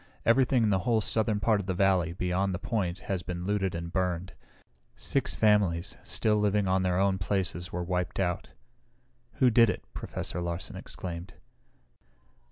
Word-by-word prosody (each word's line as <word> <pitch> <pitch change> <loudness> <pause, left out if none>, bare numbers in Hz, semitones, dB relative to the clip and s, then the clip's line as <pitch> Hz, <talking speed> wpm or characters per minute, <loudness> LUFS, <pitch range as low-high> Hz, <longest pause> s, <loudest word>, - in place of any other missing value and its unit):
Everything 125 0 +4
in 110 - +3
the 95 - +3
whole 115 +4 +2
southern 110 0 +1
part 110 0 +2
of 100 - -5
the 95 - -1
valley, 95 -3 +3
beyond 90 +2 -1
the - - -2
point, 95 -5 -2
has 95 -2 -2
been 90 0 -5
looted 95 -3 0
and 85 +1 -5
burned. 90 -1 -1 0.6
Six - - -1
families, 100 -4 +2
still 105 -1 +1
living 105 -1 +2
on 95 0 +2
their 90 -1 +1
own 95 0 +2
places 90 -2 -1
were 90 0 -3
wiped 90 +1 -2
out." 90 -2 -1 0.8
"Who 125 -2 +3
did 115 -1 +6
it?" 90 - -3
Professor 90 - -4
Larsen 85 +1 -4
exclaimed. 85 -1 -7
95 Hz, 165 wpm, -29 LUFS, 90-105 Hz, 0.8 s, did